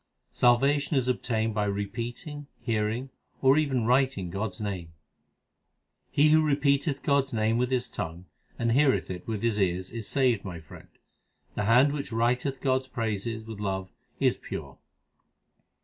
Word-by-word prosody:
Salvation 140 +4 +3
is 130 -1 +1
obtained 115 -3 0
by 105 -1 0
repeating, 120 +8 -4
hearing, 115 +3 -1 0.3
or 135 0 +5
even 135 -6 +1
writing 125 -7 +2
God 100 +5 -1
s 90 -3 -10
name: 95 -6 -4 1.2
He 150 +2 +4
who 155 0 +6
repeateth 140 -1 +1
God 140 -1 +3
s 135 - -11
name 110 +1 +1
with 125 0 +1
his 125 -2 0
tongue, 85 -1 -6 0.3
and 115 0 0
heareth 135 -4 +3
it 90 -1 -7
with 110 -2 -3
his 115 -3 +1
ears, 95 -1 0
is 115 -3 -5
saved, 125 -4 +2
my 90 -4 -6
friend. 80 -1 -14 0.6
The 105 - -2
hand 125 +6 +5
which 140 -4 -4
writeth 125 +4 0
God 130 -1 +2
s 130 - -16
praises 110 -2 -3
with 110 -2 -8
love 95 -2 -3 0.3
is - - +2
pure. - - -7
115 Hz, 160 wpm, -28 LUFS, 105-135 Hz, 1.2 s, who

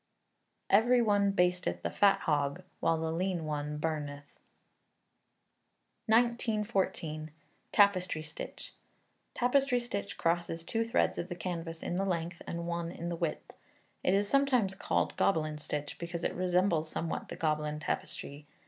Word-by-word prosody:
[EVERY 240 +5 +6
ONE 205 -2 +3
BASTETH 180 -2 +1
THE - - -1
FAT 200 -1 +4
HOG, 145 -3 0 0.2
WHILE 165 - +2
THE 160 0 -1
LEAN 175 0 -1
ONE 150 0 -3
BURNETH.] 150 -2 -3 1.8
1914. 215 -9 +1 0.4
Tapestry 185 -6 +3
Stitch. 155 0 -8 0.6
Tapestry 250 +1 +3
stitch 235 -4 -4
crosses 165 -1 0
two 225 +5 0
threads 230 +2 +1
of 175 - -4
the 175 - -4
canvas 165 -1 -4
in 175 - -2
the 195 - +1
length, 170 -2 -2
and 170 0 -3
one 170 0 -2
in 170 0 -5
the 170 - -2
width. 165 -2 -3 0.5
It 185 - +3
is 200 +1 +2
sometimes 255 -7 +3
called 195 - 0
Gobelin 155 -4 +1
stitch, 145 0 -4
because 170 0 -4
it - - 0
resembles 180 -3 +2
somewhat 165 - -3
the - - -5
Gobelin 150 -1 -1
tapestry. 145 -1 -4
175 Hz, 140 wpm, -31 LUFS, 155-200 Hz, 1.8 s, EVERY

